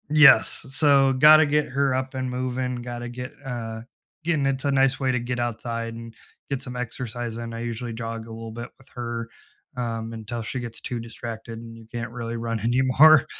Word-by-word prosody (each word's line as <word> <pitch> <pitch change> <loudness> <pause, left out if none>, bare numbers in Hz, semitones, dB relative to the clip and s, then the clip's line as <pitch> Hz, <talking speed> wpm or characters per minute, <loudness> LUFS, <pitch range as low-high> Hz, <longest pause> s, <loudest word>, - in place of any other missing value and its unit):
Yes, 150 -2 +7
s 135 0 -8
so 140 -3 +5
gotta 155 +4 +8
get 150 0 +2
her 135 +1 +1
up 130 +1 -2
and 130 -1 -2
moving, 125 0 -2
gotta 120 0 -5
get, 125 +3 -7
uh, 115 -3 -4 0.4
getting 160 -4 +1
into 135 0 0
a - - +2
nice 135 -1 +3
way 130 -2 +1
to 125 - +1
get 120 +1 -3
outside 115 -1 -3
and 115 0 -9 0.4
get 135 -2 -2
some 125 -2 -6
exercise 120 -1 -4
and 115 -1 -5
I - - -5
usually 120 0 -4
jog 115 0 -5
a - - -10
little 115 0 -7
bit 120 +2 -7
with 135 0 -21
her, 120 -1 -5 0.5
um, 115 -2 -3
until 115 +1 -5
she 125 +3 -4
gets 120 -2 -5
too 120 - -3
distracted 115 0 -7
and 115 0 -10
you 115 -1 -14
can't 115 -1 -4
really 115 -1 -4
run 115 -1 -2
anymore. 130 +6 +6
120 Hz, 200 wpm, -25 LUFS, 115-130 Hz, 0.5 s, gotta